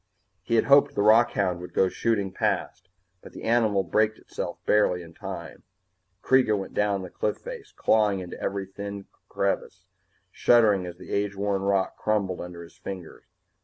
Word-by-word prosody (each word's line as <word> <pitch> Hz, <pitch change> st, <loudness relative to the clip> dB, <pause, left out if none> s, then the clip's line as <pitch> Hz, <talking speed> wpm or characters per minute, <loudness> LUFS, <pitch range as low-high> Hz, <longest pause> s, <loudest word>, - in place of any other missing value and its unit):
He 115 Hz, -, -1 dB
had 110 Hz, -, +3 dB
hoped 140 Hz, 0 st, +5 dB
the 100 Hz, -, +1 dB
rockhound 105 Hz, -5 st, +4 dB
would 90 Hz, -, -10 dB
go 95 Hz, -, +4 dB
shooting 100 Hz, -1 st, -1 dB
past, 95 Hz, -, -2 dB, 0.3 s
but -, -, -13 dB
the -, -, -10 dB
animal 110 Hz, -4 st, +2 dB
braked 110 Hz, +4 st, +1 dB
itself -, -, -6 dB
barely 90 Hz, -4 st, +2 dB
in 85 Hz, -1 st, -13 dB
time. -, -, -8 dB, 0.6 s
Kreega 130 Hz, -5 st, +4 dB
went 95 Hz, -, -6 dB
down 100 Hz, -2 st, 0 dB
the 90 Hz, -, -9 dB
cliff 105 Hz, -, -2 dB
face, -, -, -9 dB
clawing 105 Hz, -3 st, +2 dB
into 90 Hz, -1 st, -8 dB
every 100 Hz, -1 st, -2 dB
tiny 100 Hz, +1 st, -7 dB, 0.2 s
crevice, 95 Hz, -1 st, -2 dB, 0.5 s
shuddering 105 Hz, -7 st, +4 dB
as 85 Hz, -1 st, -8 dB
the -, -, -11 dB
age 100 Hz, 0 st, -1 dB
worn 100 Hz, 0 st, -1 dB
rock 100 Hz, -1 st, 0 dB
crumbled 100 Hz, -4 st, -1 dB
under 85 Hz, -1 st, -8 dB
his 85 Hz, -, -16 dB
fingers. 90 Hz, -4 st, -8 dB
100 Hz, 165 wpm, -26 LUFS, 95-110 Hz, 0.6 s, hoped